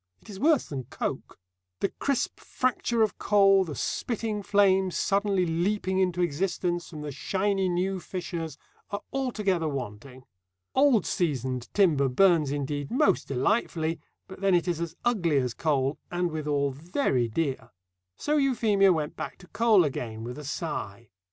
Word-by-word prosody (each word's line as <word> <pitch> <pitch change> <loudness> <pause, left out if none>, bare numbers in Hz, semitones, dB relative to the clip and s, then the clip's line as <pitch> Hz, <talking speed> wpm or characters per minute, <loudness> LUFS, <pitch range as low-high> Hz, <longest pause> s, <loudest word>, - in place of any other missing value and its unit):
It - - -13
is 195 - -8
worse 300 +1 +3
than 135 -4 -5
coke. 130 - -5 0.4
The 200 - +1
crisp 275 -3 -1
fracture 240 -2 0
of 215 - -1
coal, 195 -2 +5
the 155 -5 -6
spitting 220 - -2
flames 190 -2 +3
suddenly 200 -2 +1
leaping 185 +3 0
into 180 -1 +1
existence 175 +1 -1
from 155 -3 -8
the 150 -1 -5
shiny 195 +6 0
new 185 +2 0
fissures, 170 -3 -5 0.3
are 205 0 -4
altogether 210 -11 0
wanting. 130 -1 -6 0.5
Old 265 -7 +4
seasoned 130 -7 -2
timber 155 -9 +4
burns 165 +1 +4
indeed 145 0 -3
most 295 +4 +2
delightfully, 160 - 0 0.3
but 190 0 -11
then 195 -2 +4
it 175 +1 +1
is 170 -2 -1
as 170 -1 -4
ugly 175 -11 +2
as 125 -3 0
coal, 140 -2 0
and 175 -1 -1
withal 145 -2 0
very 140 - 0
dear. 130 -1 -2 0.5
So 300 +1 0
Euphemia 220 -8 +3
went 155 -4 -1
back - - -6
to 180 - -16
coal 225 -5 +4
again 115 -5 -4
with 125 +4 -6
a - - -8
sigh. 120 -8 -5
175 Hz, 150 wpm, -27 LUFS, 145-200 Hz, 0.5 s, coal